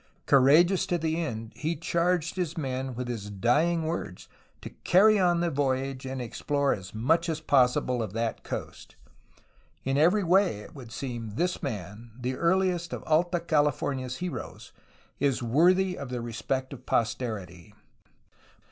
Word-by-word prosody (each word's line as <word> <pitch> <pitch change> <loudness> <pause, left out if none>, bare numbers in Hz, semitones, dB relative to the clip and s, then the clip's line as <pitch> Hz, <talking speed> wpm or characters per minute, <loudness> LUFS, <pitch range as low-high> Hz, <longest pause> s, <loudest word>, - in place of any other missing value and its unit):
Courageous 155 +8 +5
to 175 - +1
the 160 0 -1
end, 115 -6 -5
he 160 +5 -2
charged 170 +1 0
his 175 -4 -3
men 130 -3 -3
with 125 +1 -4
his 110 -4 -5
dying 150 - +1
words 155 - -4 0.3
to - - -8
carry 210 +3 +5
on 175 -2 +3
the 170 -1 0
voyage 135 -1 -1
and 130 0 -4
explore 140 +4 0
as 95 +1 -8
much 165 +10 +1
as 160 -1 -1
possible 125 -4 +2
of 110 -4 -4
that 115 0 -2
coast. - - -7 0.9
In 135 +1 0
every 180 +7 +4
way, 180 - +3
it - - -13
would 125 -5 -11
seem, 115 -3 -5
this 180 +6 -1
man, 110 - -6
the 125 +1 -2
earliest 175 +1 +1
of - - -5
Alta 175 +3 +2
California's 145 -5 0
heroes, 180 -2 -6 0.5
is 135 -3 +1
worthy 180 +9 +3
of 140 - -6
the 125 -1 -3
respect 130 +3 -3
of 130 -1 -12
posterity. 105 -7 -2
140 Hz, 150 wpm, -28 LUFS, 120-170 Hz, 0.9 s, Courageous